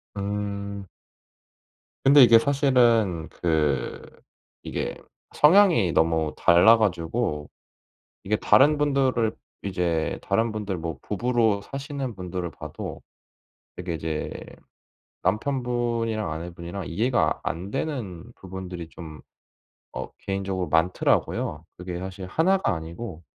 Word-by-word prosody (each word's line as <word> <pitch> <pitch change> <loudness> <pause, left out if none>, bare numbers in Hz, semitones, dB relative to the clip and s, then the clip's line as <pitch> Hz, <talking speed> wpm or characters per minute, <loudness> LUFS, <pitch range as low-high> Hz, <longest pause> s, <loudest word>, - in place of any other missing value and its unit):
음. 100 -1 -4 1.2
근데 140 0 +8
이게 115 -1 +8
사실은 120 - +2
그 75 -5 -1 0.6
이게 - - -3 0.4
성향이 160 - +5
너무 80 -1 +2
달라 90 +7 +6
가지고 85 -5 -1 0.8
이게 105 +2 +1
다른 140 +10 +5
분들을 135 -6 +1 0.3
이제 85 -4 -1
다른 115 +1 +1
분들 105 -3 -3
뭐 80 -4 -5
부부로 110 -1 +1
사시는 135 -2 -5
분들을 90 -1 -4
봐도 - - -7 0.8
되게 90 -2 -4
이제 80 -1 -3 0.9
남편분이랑 115 - -1
아내분이랑 85 +3 -6
이해가 115 +9 +1
안 95 +5 -4
되는 115 - -4
부분들이 90 -3 -7
좀 80 -3 -10 0.7
어 - - -5
개인적으로 95 -2 -3
많더라고요. 80 -2 +1
그게 90 -1 -6
사실 95 0 -6
1 175 - +2
가 90 - 0
아니고 85 +2 -7
100 Hz, 230 characters per minute, -25 LUFS, 85-120 Hz, 1.2 s, 근데